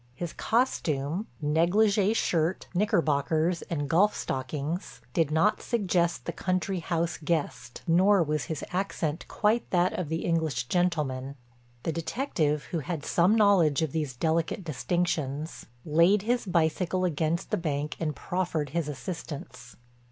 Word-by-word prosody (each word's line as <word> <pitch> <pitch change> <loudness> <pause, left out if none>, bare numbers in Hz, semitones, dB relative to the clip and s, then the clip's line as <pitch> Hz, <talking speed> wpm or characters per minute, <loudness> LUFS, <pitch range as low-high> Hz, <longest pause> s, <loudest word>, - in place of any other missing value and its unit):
His 170 +3 -5
costume—negligée 190 - +1
shirt, 170 -3 0
knickerbockers 165 -4 +1
and 145 -4 -2
golf 195 +8 +3
stockings—did 150 +4 -3
not 160 +7 +2
suggest 175 - 0
the - - -2
country 185 0 -1
house 165 0 -1
guest, 150 -6 -2
nor 185 +2 +4
was 150 -2 -1
his 160 -3 -4
accent 180 -4 -2
quite 220 +3 +1
that 180 0 +2
of 175 -5 -3
the 160 +1 -2
English 160 -7 0
gentleman. 150 -7 0 0.5
The - - 0
detective, 160 - -1
who 170 - 0
had 155 0 -4
some 180 +5 +3
knowledge 185 -9 +4
of 155 - -1
these 150 -5 -2
delicate 165 +7 0
distinctions, 155 -2 -2 0.2
laid 170 +6 +4
his 240 0 0
bicycle 180 +2 +1
against 165 0 -1
the - - +2
bank 150 -3 -2
and 155 -2 -2
proffered 175 -5 -2
his 165 -1 -1
assistance. 140 -5 -7
165 Hz, 130 wpm, -28 LUFS, 150-185 Hz, 0.5 s, nor